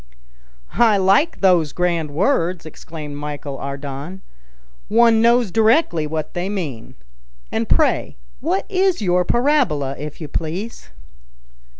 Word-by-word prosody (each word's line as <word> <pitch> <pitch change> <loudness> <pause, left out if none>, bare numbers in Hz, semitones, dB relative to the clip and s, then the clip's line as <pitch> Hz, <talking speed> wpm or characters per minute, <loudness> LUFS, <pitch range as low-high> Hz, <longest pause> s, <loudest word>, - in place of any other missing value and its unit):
"I 225 -4 +5
like 195 - +2
those 175 -6 +3
grand 170 -3 0
words," 175 - 0
exclaimed 155 -2 -8
Michel 145 -1 -6
Ardan; 140 +6 -6 0.6
"one 230 0 +4
knows 235 -3 +3
directly 220 - +2
what 155 0 -4
they 175 +2 -3
mean. 155 - -5 0.6
And - - -2
pray - - +1 0.2
what 195 - -1
is 375 - +1
your 180 -1 +2
parabola, 240 - +1
if 150 0 -7
you 155 - -6
please?" 170 +10 -5
180 Hz, 115 wpm, -20 LUFS, 150-225 Hz, 0.6 s, I